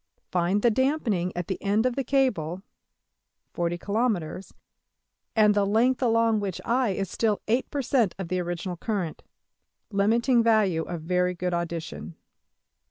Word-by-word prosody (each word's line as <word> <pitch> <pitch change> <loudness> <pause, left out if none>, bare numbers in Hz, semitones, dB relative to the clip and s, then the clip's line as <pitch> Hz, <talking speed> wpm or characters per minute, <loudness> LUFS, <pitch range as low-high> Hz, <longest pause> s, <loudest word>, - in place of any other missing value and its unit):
Find 180 +3 +1
the 240 - +5
damping 230 - 0
at 175 - -2
the 190 - -4
end 210 +3 +1
of 250 -1 +1
the 275 - -1
cable 200 - 0 0.9
($40$~kilometres), 180 +1 -1 0.8
and 210 -2 +5
the 205 0 +2
length 230 +6 +2
along 230 -2 +3
which 195 -4 -3
$i$~is 230 -6 0
still 215 +3 0
$8$\%~of 240 - 0
the 185 +2 -1
original 175 +1 -4
current 190 -6 -3 0.7
(limiting 230 +5 +3
value 215 -7 +3
of 170 -2 -5
very 180 +1 +1
good 180 0 -2
audition). 170 -1 -4
200 Hz, 125 wpm, -26 LUFS, 175-230 Hz, 0.9 s, the